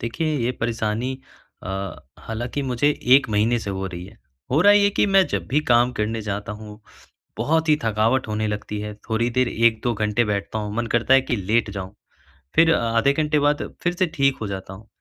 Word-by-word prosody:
देखिए 150 +7 -2
ये 125 - +1
परेशानी 115 +2 -1 0.5
अ, - - -7 0.5
हालाँकि 120 +5 -4
मुझे 135 +2 +1 0.3
1 140 - 0
महीने 110 +3 +2
से 105 - -5
हो 95 0 -3
रही 90 -1 -7
है। - - -16 0.3
हो 145 - +3
रहा 205 +3 +7
है 205 - +6
ये 200 0 +3
कि - - +4
मैं 195 -2 +4
जब - - -3
भी 145 +4 +2
काम 120 +1 +4
करने 110 -1 -2
जाता 105 0 -4
हूँ, 105 0 -10 0.6
बहुत 160 +1 +1
ही 155 - +5
थकावट 115 +4 +1
होने 110 0 -1
लगती 105 0 -4
है, 105 0 -6 0.2
थोड़ी 115 +2 +1
देर 130 -1 +3
1-2 115 +1 +1
घंटे 105 +2 +1
बैठता 105 +1 -2
हूँ, 105 -1 -4
मन 120 0 -1
करता 120 +3 +4
है 135 - +7
कि 120 - -2
लेट 105 +3 0
जाऊँ। 100 -1 -7 0.6
फिर 165 0 +5
आधे 115 +4 +2
घंटे 150 0 +1
बाद 145 0 +1 0.2
फिर 175 0 +1
से 185 +1 +1
ठीक 140 -1 +2
हो 110 - -2
जाता 95 -1 -6
हुँ। 105 +3 -13
115 Hz, 210 wpm, -22 LUFS, 105-140 Hz, 0.6 s, रहा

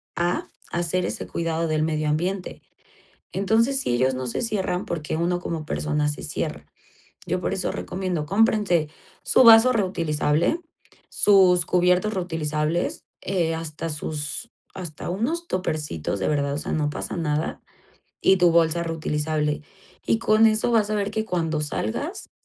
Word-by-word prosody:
a 175 +1 -1 0.2
hacer 175 +1 0
ese - - -4
cuidado 165 0 -2
del 155 -1 +1
medio 155 -1 0
ambiente. 180 +5 -2 0.7
Entonces, 225 +7 +2
sí 125 - -1
ellos 130 +2 +2
no 130 0 -4
se - - -2
cierran 205 -4 -1
porque 155 -4 -3
uno 175 +2 0
como 165 -3 -4
persona 150 -1 -1
se 150 - -4
cierra. - - -4 0.6
Yo 180 - -1
por - - -1
eso 195 -2 -1
recomiendo 180 -5 -3
cómprense 195 -5 +2 0.3
su - - +5
vaso 230 +1 +8
reutilizable, 170 - +1 0.5
sus 185 -4 +4
cubiertos 180 +4 +2
reutilizables, 160 -2 -1 0.2
eh, 170 -4 0
hasta 160 0 -5
sus 150 +6 -4 0.2
hasta 170 -5 -6
unos 300 - -2
tuppercitos, 150 - -2
de 95 - -1
verdad, 140 -2 0
o - - -2
sea, - - -3
no 150 -2 0
pasa 150 - -4
nada, 155 -2 -2 0.6
y 190 - +5
tu 175 -1 +5
bolsa 165 0 +3
reutilizable. 155 -2 -1 0.4
Y 225 - +2
con 220 0 +4
eso 220 +2 +2
vas 215 -2 +3
a - - 0
ver 205 0 -1
que 220 0 -1
cuando 165 -5 -1
salgas 145 -7 -3
170 Hz, 150 wpm, -24 LUFS, 155-195 Hz, 0.7 s, vaso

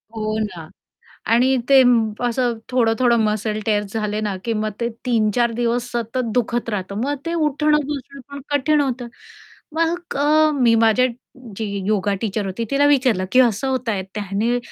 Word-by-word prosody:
हो 215 0 -2
ना. 175 -6 -7 0.6
आणि 255 +3 +3
ते 270 -1 +8 0.5
असं 240 -1 0
थोडं-थोडं 235 -1 +2
मसल 215 0 -1
टिअर 210 -2 +1
झाले 210 -1 -2
ना, 205 -3 -2
की 230 - 0
मग 215 0 -1
ते 235 0 -1 0.2
3-4 230 0 +1
दिवस 240 +1 -1
सतत 235 +1 -3
दुखत 240 -1 -1
राहतं, 200 -2 -4
मग 290 +1 -1
ते 335 - -2
उठणं-बसणं 295 -2 -1
पण 280 - -7
कठीण 290 +1 +2
होतं. 255 -3 -2 0.7
मग 335 +2 -1
अ, 305 +2 +4
मी 230 -2 +5
माझ्या 225 +2 +4 0.5
जी 220 - -2 0.2
योगा 205 -1 +1
टीचर 210 -1 -2
होती, 195 +5 -3
तिला 285 +1 +3
विचारलं, 255 -9 +2
की 255 - +5
असं 245 +1 +2
होतं 255 -3 -1
आहे, 190 -2 -2
त्याने 210 +4 -1
235 Hz, 160 wpm, -20 LUFS, 215-265 Hz, 0.7 s, ते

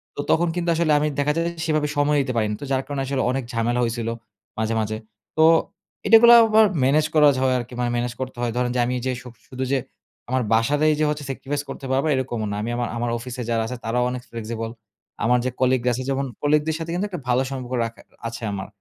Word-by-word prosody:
তো - - -10
তখন 175 +2 +3
কিন্তু 175 -1 -1
আসলে 165 -1 +1
আমি 150 - +1
দেখা 145 +1 +2
যায় 165 0 0
যে 170 - -2
সেভাবে 155 -2 +1
সময় 145 0 +3
দিতে 130 -2 -2
পারি 110 - +2
না। - - -2
তো 145 - -4
যার 130 0 +2
কারণে 140 -2 -3
আসলে 135 0 -1
অনেক 135 0 -2
ঝামেলা 120 +2 0
হইছিল 115 -1 -2 0.5
মাঝে, 110 +1 0
মাঝে। 110 0 -2 0.4
তো 160 - +5 0.6
এটা 225 +2 +9
গুলাও 235 0 +10
আবার 220 0 +6 0.2
মেনেজ 150 +4 +3
করা 150 -2 +6
হয় 130 -1 +3
আরকি 120 +1 -8
মানে 120 - 0
মেনেজ 120 0 -2
করতে 130 -2 -5
হয়। 120 -1 0
ধরেন 125 0 0
যে 125 - +1
আমি 125 - -1
এইযে 130 +1 -2
সুব 125 - -11
শুধু 130 0 -4
যে 140 - +3 0.5
আমার 130 0 +1
বাসাতেই 145 +7 +3
যে 155 - +3
হচ্ছে 150 -1 -3
সেক্রিফাইস 140 +2 -3
করতে - - -7
পারবো 135 +3 +1
এরকমও 120 -4 -2
না। - - -2
আমি 110 - -3
আমার 120 -1 -1
আমার 120 0 -1
অফিসে 125 +1 -6
যারা 115 -1 +1
আছে 125 - -5
তারাও 120 +2 +1
অনেক 125 0 -5
Flexible 115 0 -5 0.5
আমার 125 +2 +3
যে - - +1
কলিগরা 125 -1 +2
আছে 130 +2 -3
যেমন 135 0 0 0.2
কলিগদের 150 +1 +2
সাথে 165 - -5
কিন্তু 180 +4 -1
একটা 180 - -5
ভালো 125 +1 +3
সম্পর্ক 130 -1 -5
রাখা 115 0 -8 0.3
আছে 115 0 -7
আমার। 95 -1 -5
130 Hz, 235 wpm, -23 LUFS, 120-145 Hz, 0.6 s, গুলাও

